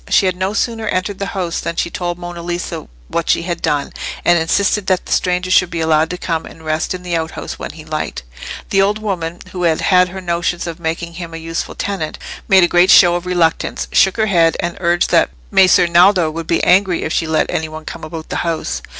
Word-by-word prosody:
She - - +4
had 185 -1 +1
no 190 +2 -2
sooner 225 -1 -1
entered 185 +1 -2
the 200 - -2
house 175 -3 -2
than 170 - -4
she 170 - -1
told 175 0 -3
Monna 175 -1 -7
Lisa 175 +1 -4 0.2
what 170 - -3
she - - +2
had 170 -1 -4
done, 145 -1 -1 0.3
and 175 -1 +5
insisted 200 +4 +1
that 185 -1 +1
the - - -9
stranger 180 0 0
should 180 -1 +4
be 170 - -4
allowed 160 0 +2
to 180 - -4
come 165 -2 -2
and 160 - -14
rest 155 +3 -1
in 180 - -9
the 175 -1 -2
outhouse 160 -1 -4
when - - -6
he - - -12
liked. - - -4 0.5
The 195 - +4
old 205 +2 +2
woman, 175 -6 -4
who 180 - -5
had 165 -2 +2
had 180 -1 +3
her 190 +2 -7
notions 175 -1 -2
of 170 -1 -6
making 170 +1 -3
him 165 -1 -7
a - - -4
useful 165 0 -5
tenant, 190 -6 -3 0.3
made 190 -2 +6
a - - +5
great 175 +2 +4
show 175 -3 +7
of 175 +1 -3
reluctance, 170 -3 0
shook 190 +2 +3
her 220 - +2
head, 170 -5 +3
and 170 0 -2
urged 175 -1 +1
that - - +4 0.2
Messer 185 -1 +5
Naldo 175 -1 +4
would 165 +1 -6
be 165 - +1
angry 185 -1 +3
if 160 - -2
she 165 - 0
let 160 0 0
any 160 0 -2
one 155 0 -9
come 165 - -8
about 155 0 -7
the - - -2
house. 165 -2 -2
175 Hz, 235 wpm, -17 LUFS, 165-185 Hz, 0.5 s, show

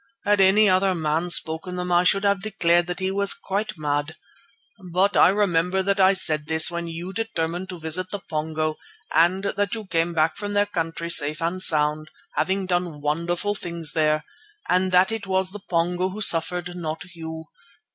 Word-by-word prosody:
Had 205 -1 +3
any 200 +3 +5
other 190 0 +2
man 160 +1 -1
spoken 170 +2 +1
them 180 0 -4
I 175 0 +4
should 195 +2 +3
have 200 -1 +1
declared 175 -5 +1
that 180 0 -4
he 190 0 -1
was 200 0 +1
quite 200 0 -4
mad. 145 0 -2 0.8
But 190 +4 +2
I - - +6
remember 190 -2 +1
that 200 +1 0
I 190 0 +5
said 155 -5 +1
this 160 +1 +3
when 170 0 -4
you 170 +3 -6
determined 180 -4 -3
to 180 -2 -7
visit 165 +3 -2
the 205 - -3
Pongo, 155 -3 -3 0.4
and 175 +4 +3
that 200 +1 -1
you 220 -2 -7
came 170 -2 -1
back 155 0 +1
from 205 -1 -4
their 205 0 +3
country 170 -3 -3
safe 150 -1 +2
and 170 +3 -2
sound, 155 -1 +2 0.3
having 190 0 0
done 175 -4 -2
wonderful 170 +7 -1
things 170 -6 -4
there, 155 -1 +1 0.4
and 185 +1 +1
that 185 +3 +4
it 225 -3 -5
was 190 0 0
the 205 0 -9
Pongo 175 +2 0
who 200 +3 -8
suffered, 175 0 +2
not 160 -1 -5
you. 160 -1 -7
175 Hz, 185 wpm, -23 LUFS, 160-190 Hz, 0.8 s, I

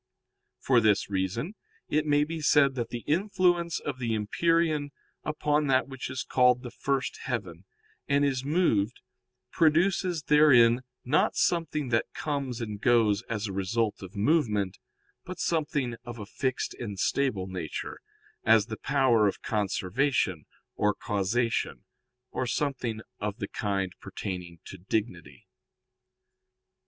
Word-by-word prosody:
For 125 -3 +3
this 105 -2 +2
reason 100 - -2 0.3
it 155 +1 0
may 145 0 +4
be 160 +1 -4
said 145 -2 +4
that 120 -3 -3
the 120 -1 -5
influence 175 -1 +1
of 135 -3 -5
the 115 -3 -1
empyrean 155 +7 +1 0.3
upon 150 -1 0
that 130 0 +3
which 135 -2 -6
is 130 0 -3
called 125 0 +3
the 120 - -7
first 135 +2 -2
heaven, 95 -8 -4 0.4
and 140 0 +3
is 130 -2 0
moved, 135 - +1 0.5
produces 170 +1 +2
therein 130 -6 +6 0.2
not 145 +5 +2
something 160 -5 0
that 115 -1 0
comes 140 -5 -3
and 105 -2 -5
goes 115 -4 +3
as 110 -2 -2
a 100 - -4
result 105 +3 -1
of 95 +1 -10
movement, 105 - +1 0.4
but 185 -1 -7
something 150 -8 -1
of 120 -1 -8
a 105 - -6
fixed 130 +5 -2
and 105 -5 -5
stable 115 -3 0
nature, 90 -4 -5 0.4
as 110 -2 +5
the 110 -2 -6
power 130 -6 +3
of 100 - -3
conservation 100 - 0 0.3
or 105 -1 +1
causation, 105 - -1 0.5
or 130 - -2
something 125 -6 -2 0.2
of 105 0 -3
the 100 -5 -4
kind 95 -3 -2
pertaining 90 -3 -6
to 95 - -10
dignity. 90 - -4
120 Hz, 135 wpm, -28 LUFS, 105-145 Hz, 0.5 s, therein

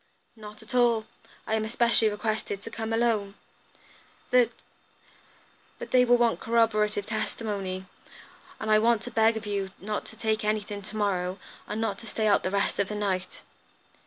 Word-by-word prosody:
"Not 215 0 -11
at 220 - -11
all. 235 -3 +3 0.4
I 220 - -2
am 220 0 +1
especially 230 0 +3
requested 210 -1 -3
to 225 - -8
come 225 0 -4
alone." 225 -4 +1 1.0
"The 250 -2 +6
d - - -22 0.8
!" - - -32
"But - - -8
they 250 -1 +6
will 245 0 +5
want 235 -1 +2
corroborative 215 -3 +2
testimony, 205 -3 -3 0.7
and 220 0 -2
I 215 - +6
want 230 0 +3
to 245 - -7
beg 225 0 +3
of 220 - -6
you 200 -2 -2
not 210 +2 -3
to - - -12
take 220 0 -1
anything 210 -1 -1
to 215 +2 -7
morrow, 185 -3 0 0.3
and 215 - -3
not 215 -3 -1
to 230 - -10
stay 220 0 -1
out 205 -2 +4
the - - -1
rest 200 +1 0
of 200 - +2
the 210 - -5
night. 190 -3 -2
215 Hz, 180 wpm, -27 LUFS, 205-225 Hz, 1.0 s, The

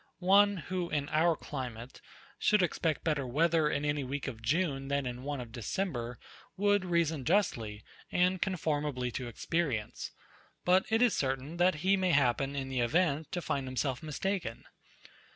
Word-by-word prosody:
One, 200 +2 +5
who 180 +1 -3
in 145 -1 -1
our 165 +2 +3
climate, 125 -5 -7 0.4
should 210 -3 +4
expect 165 -2 0
better 150 -5 0
weather 160 +3 +3
in 145 0 -1
any 145 -1 0
week 135 +2 -4
of 115 -4 -6
June 135 +1 0
than 140 0 0
in 125 0 -4
one 145 +1 -3
of 120 -2 -7
December, 120 - -3 0.4
would 205 -1 +3
reason 165 -5 +1
justly, 115 - 0 0.3
and 180 +1 +2
conformably 150 -8 -1
to 125 +1 -4
experience; 120 -2 -2 0.6
but 185 +1 +4
it 225 +2 +3
is 240 - +4
certain, 135 +4 -2
that 180 0 +4
he 195 +1 +5
may 185 -2 +2
happen, 135 0 +2
in 135 -1 -3
the 130 -1 -2
event, 155 +4 +1
to 175 -2 -2
find 135 -3 -2
himself 130 0 -2
mistaken. 155 - -3
150 Hz, 160 wpm, -31 LUFS, 130-180 Hz, 0.6 s, One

